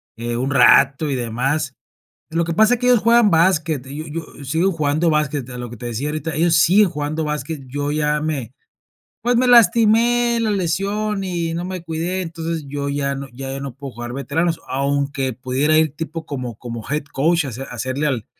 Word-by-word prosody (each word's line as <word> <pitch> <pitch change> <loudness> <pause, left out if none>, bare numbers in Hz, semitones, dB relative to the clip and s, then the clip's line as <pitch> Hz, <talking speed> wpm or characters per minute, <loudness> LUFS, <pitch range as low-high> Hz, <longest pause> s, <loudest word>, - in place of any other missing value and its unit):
eh, 120 +1 -3
un 130 +3 -1
rato 140 +2 +5
y 135 - 0
demás. 130 +4 -1 0.6
Lo 165 +1 0
que 165 0 -3
pasa 220 +5 +5
es 240 - -6
que 250 - 0
ellos 245 -3 +5
juegan 230 -2 +5
básquet, 160 -5 +2
y 150 +2 -7
yo 165 0 -4
yo 145 - -10
sigo 165 +8 +1
jugando 155 0 +1
básquet, 145 -4 -1
a 125 - -7
lo 120 -1 -5
que 120 - -9
te 120 - -7
decía 125 +6 -3
ahorita, 155 +1 -3
ellos 165 +1 +3
siguen 185 +6 +5
jugando 155 0 -3
básquet, 150 0 -4
yo 145 +2 -3
ya 150 0 0
me 140 -7 -3 0.7
pues, 245 0 +1
me 255 +1 +3
lastimé 235 +1 +4
la 220 - 0
lesión 200 +3 -1
y 170 -3 -2
no 175 +2 -3
me 185 -2 -5
cuidé, 170 +3 -2
entonces, 165 -2 -4
yo 140 0 -4
ya 140 -1 -1
no 135 0 -6
ya 135 +1 -6
ya 135 - -4
no 135 -3 -6
puedo 140 -1 -8
jugar 120 +1 -6
veteranos. 160 +5 -1
Aunque 140 -1 -1
pudiera 135 +5 +1
ir 155 -3 +2
tipo 160 0 -5
como 125 -6 -5
como 115 -3 -7
head 150 0 -1
coach 165 +4 +2
a - - -4
hace 125 +3 -6
hacerle 130 +4 -3
al 120 -6 -2
150 Hz, 205 wpm, -20 LUFS, 135-170 Hz, 0.7 s, rato